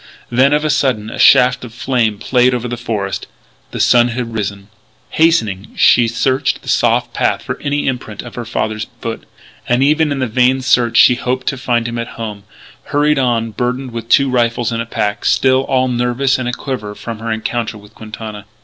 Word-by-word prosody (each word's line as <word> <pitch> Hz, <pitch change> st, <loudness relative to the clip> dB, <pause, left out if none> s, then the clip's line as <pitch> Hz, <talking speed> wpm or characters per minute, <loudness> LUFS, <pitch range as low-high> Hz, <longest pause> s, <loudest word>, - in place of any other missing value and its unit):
Then, 130 Hz, +3 st, +4 dB
of 150 Hz, +1 st, +1 dB
a 155 Hz, -, +2 dB
sudden, 125 Hz, -7 st, 0 dB
a -, -, -7 dB
shaft 125 Hz, 0 st, +5 dB
of 115 Hz, -2 st, -10 dB
flame 120 Hz, -5 st, 0 dB
played 125 Hz, +3 st, +2 dB
over 125 Hz, 0 st, -3 dB
the 120 Hz, -, -3 dB
forest. 110 Hz, -5 st, -4 dB, 0.4 s
The -, -, -6 dB
sun 120 Hz, -1 st, +4 dB
had 120 Hz, -1 st, -4 dB
risen. 100 Hz, -2 st, -4 dB, 0.4 s
Hastening, 110 Hz, -, +1 dB
she 120 Hz, -1 st, +5 dB
searched 130 Hz, +3 st, 0 dB
the -, -, -8 dB
soft -, -, +1 dB
path -, -, 0 dB
for -, -, -5 dB
any 145 Hz, 0 st, -1 dB
imprint 120 Hz, -5 st, -4 dB
of -, -, -10 dB
her 120 Hz, -, -5 dB
father's 110 Hz, -1 st, -3 dB
foot. 115 Hz, -1 st, -6 dB, 0.4 s
And 125 Hz, +2 st, +3 dB
even 150 Hz, +1 st, +2 dB
in 140 Hz, -, -1 dB
the 130 Hz, -, 0 dB
vain 125 Hz, +3 st, +2 dB
search 120 Hz, -2 st, +2 dB
she -, -, +7 dB
hoped 125 Hz, +1 st, -3 dB
to -, -, -3 dB
find 120 Hz, -2 st, 0 dB
him 120 Hz, 0 st, -4 dB
at 115 Hz, -, -3 dB
home 105 Hz, -3 st, -6 dB, 0.4 s
hurried 150 Hz, 0 st, +1 dB
on 115 Hz, -3 st, 0 dB
burdened 125 Hz, +3 st, -3 dB
with 115 Hz, 0 st, -7 dB
two 140 Hz, -, +5 dB
rifles 120 Hz, -1 st, 0 dB
and 115 Hz, 0 st, -2 dB
a 115 Hz, -, -6 dB
pack, 105 Hz, -2 st, -2 dB
still 130 Hz, 0 st, +3 dB
all 130 Hz, -1 st, +1 dB
nervous 125 Hz, +2 st, 0 dB
and 125 Hz, -1 st, -2 dB
aquiver 125 Hz, -5 st, -5 dB
from 115 Hz, 0 st, -7 dB
her 115 Hz, 0 st, -4 dB
encounter 110 Hz, 0 st, -3 dB
with 105 Hz, +1 st, -16 dB
Quintana. 110 Hz, -1 st, -9 dB
120 Hz, 195 wpm, -16 LUFS, 110-130 Hz, 0.4 s, she